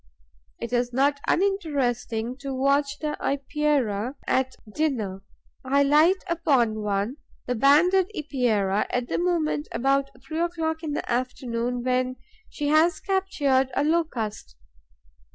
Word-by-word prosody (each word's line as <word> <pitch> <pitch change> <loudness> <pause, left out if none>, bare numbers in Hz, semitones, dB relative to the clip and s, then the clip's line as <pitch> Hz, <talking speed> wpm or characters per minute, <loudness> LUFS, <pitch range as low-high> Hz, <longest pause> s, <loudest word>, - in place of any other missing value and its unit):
It 235 - -5
is 245 0 +1
not 280 +3 +2
uninteresting 255 - 0
to 275 -1 -5
watch 280 +2 +1
the 300 0 -3
Epeira 275 -5 0
at 260 0 0 0.2
dinner. 225 -12 -1 0.4
I 280 +2 +3
light 310 +7 +4
upon 275 - +1
one, 205 +5 -1 0.3
the 250 - -1
Banded 330 - +4
Epeira, 235 - 0
at 245 -1 -2
the - - 0
moment, 335 -4 0
about 275 +3 +1
three 315 0 -4
o'clock 325 -2 -1
in 310 -3 -3
the - - -3
afternoon, 245 -1 -2
when 255 0 0 0.3
she 290 -1 -3
has 315 +3 +4
captured 290 -10 +1
a - - +2
Locust. 250 - -1
275 Hz, 125 wpm, -25 LUFS, 245-310 Hz, 0.4 s, light